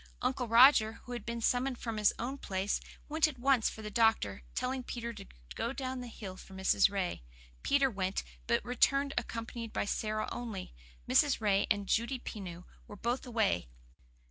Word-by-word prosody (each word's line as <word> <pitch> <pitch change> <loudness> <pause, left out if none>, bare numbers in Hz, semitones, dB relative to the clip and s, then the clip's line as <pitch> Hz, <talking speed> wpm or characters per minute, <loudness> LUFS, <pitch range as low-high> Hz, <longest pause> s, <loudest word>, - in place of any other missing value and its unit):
Uncle 250 -1 -1
Roger, 230 -1 +7
who 245 - -10
had 240 - -6
been 235 0 -3
summoned 250 +2 +1
from 230 -2 -4
his 210 -1 +4
own 255 +4 -3
place, 195 -6 -2 0.3
went 315 +1 +3
at 295 -4 -7
once 255 -2 +3
for 220 - -9
the 210 - -5
doctor, 220 - +2
telling 260 +1 -1
Peter 235 -1 -5
to 200 -3 -10 0.3
go 235 - -2
down 260 -2 -4
the 245 - -6
hill 200 -5 -8
for 190 0 -12
Mrs. 190 +1 +4
Ray. 195 - -2 0.4
Peter 280 -1 +3
went, 190 -5 -2 0.2
but - - +1
returned 275 +3 +2
accompanied 230 0 -4
by - - -1
Sara 215 +1 -1
only. 225 -6 -5 0.3
Mrs. 290 -2 +4
Ray 200 -3 +2
and 205 -1 +1
Judy 235 +6 +1
Pineau 185 -7 -7 0.2
were - - -9
both 240 +5 -2
away. 220 - +1
230 Hz, 175 wpm, -32 LUFS, 205-250 Hz, 0.4 s, Roger